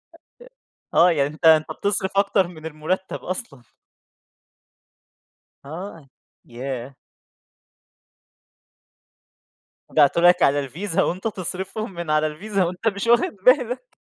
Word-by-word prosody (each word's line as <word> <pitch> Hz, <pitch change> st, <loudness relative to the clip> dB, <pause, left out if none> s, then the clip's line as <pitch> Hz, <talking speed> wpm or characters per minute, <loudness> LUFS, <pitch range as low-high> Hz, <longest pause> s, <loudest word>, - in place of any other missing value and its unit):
أ -, -, -17 dB, 0.8 s
أ -, -, -1 dB
آه. 175 Hz, +1 st, +6 dB
يعني 145 Hz, -3 st, +1 dB
أنت 160 Hz, +2 st, -6 dB
أنت 155 Hz, -1 st, +5 dB
بتصرف 190 Hz, +2 st, 0 dB
أكتر 200 Hz, -2 st, +2 dB
من 160 Hz, -3 st, -12 dB
المُرتَّب 160 Hz, +5 st, -3 dB
أصلًا. 180 Hz, -, -5 dB, 2.0 s
آه. 165 Hz, 0 st, -9 dB, 0.4 s
ياه! 130 Hz, +1 st, -6 dB, 3.0 s
يبعتوا 150 Hz, +2 st, +4 dB
لك 175 Hz, +1 st, +5 dB
على 140 Hz, +1 st, +3 dB
الفيزا 165 Hz, +7 st, -2 dB
وأنت 185 Hz, +5 st, -2 dB
تصرفهم 195 Hz, +1 st, -5 dB
من 170 Hz, -2 st, -6 dB
على 155 Hz, 0 st, +2 dB
الفيزا 195 Hz, +6 st, -2 dB
وأنت 180 Hz, +5 st, -3 dB
مش 200 Hz, 0 st, -1 dB
واخِد 235 Hz, -2 st, +3 dB
بالك. 255 Hz, -, +2 dB
175 Hz, 110 wpm, -22 LUFS, 155-200 Hz, 3.0 s, آه